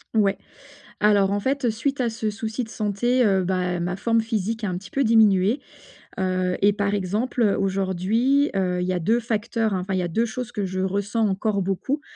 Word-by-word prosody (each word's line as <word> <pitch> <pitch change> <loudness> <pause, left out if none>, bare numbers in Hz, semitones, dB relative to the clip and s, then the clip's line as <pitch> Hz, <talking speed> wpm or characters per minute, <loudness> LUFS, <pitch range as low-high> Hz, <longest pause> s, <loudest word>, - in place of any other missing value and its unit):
Ouais, 200 -2 +2 0.6
alors 200 -2 +4
en 205 - 0
fait 265 +1 0
suite 265 +5 -2
à 245 - +2
ce 220 -1 -2
souci 220 +3 -4
de 225 - -7
santé, 240 +4 0
heu, 190 -2 +3
bah, 180 -1 -1
ma 180 +1 -2
forme 230 +3 +1
physique 225 0 -2
a 205 - -1
un 180 -1 -2
petit 200 +1 -13
peu 275 - +1
diminué, 220 -1 +4 0.6
heu, 185 -1 0
et 205 +1 +5
par 200 0 -1
exemple, 210 +6 -1
heu, 210 -3 +3
aujourd'hui, 195 +9 +1
heu, 180 -2 0
il - - -1
y 185 - -1
a 180 - 0
2 225 +8 +1
facteurs, 225 -1 -1
enfin 190 +1 -2
il 185 - +1
y 180 - 0
a 175 - -2
2 225 +8 +1
choses 240 +1 -5
que 205 -4 -2
je 185 0 -3
ressens 200 +4 0
encore 200 +1 0
beaucoup. 195 +10 -2
205 Hz, 210 wpm, -23 LUFS, 190-230 Hz, 0.6 s, et